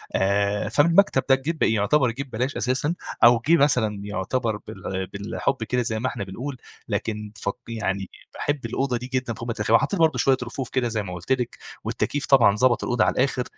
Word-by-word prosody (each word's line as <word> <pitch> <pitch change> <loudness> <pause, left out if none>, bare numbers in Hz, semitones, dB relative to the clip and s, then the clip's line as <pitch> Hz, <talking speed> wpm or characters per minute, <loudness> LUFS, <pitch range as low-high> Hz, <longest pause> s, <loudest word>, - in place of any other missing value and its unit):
آآ، 100 +2 +1
فمن 145 +8 +3
المكتب 170 -6 +4
ده 135 - +7
جه 150 +5 -3
يعتبر 115 +4 +2
جه 140 +4 -5
ببلاش 130 +1 -3
أساسًا 130 +7 0 0.3
أو 120 0 +7
جه 170 +1 +6
مثلًا 125 -8 +2
يعتبر 105 +3 -2
بال 95 0 -5
بالحب 100 +6 -3
كده 125 +3 0
زي 110 -2 -2
ما 130 - -1
إحنا 100 - -4
بنقول، 125 +8 -6 0.3
لكن 105 0 -3
ف 100 - -3 0.2
يعني 100 -4 -3 0.2
باحب 145 -4 -2
الأوضة 125 +2 -1
دي 125 +1 -7
جدًا 125 -2 -1
فوق 115 +2 -7
ما 115 - -1
تتخيلي 110 +1 +2
وحطيت 195 - -1
برضه 160 -5 +3
شوية 130 +1 +3
رفوف 125 +1 -5
كده 130 -2 0
زي 110 -2 -2
ما 90 -2 -6
قلت 90 +7 -7
لكِ 125 -2 0 0.3
والتكييف 145 -1 -2
طبعًا 120 -8 +5
ضبط 125 +2 +2
الأوضة 120 - +1
على - - +2
الآخر 130 -1 +1
120 Hz, 200 wpm, -24 LUFS, 105-135 Hz, 0.3 s, ده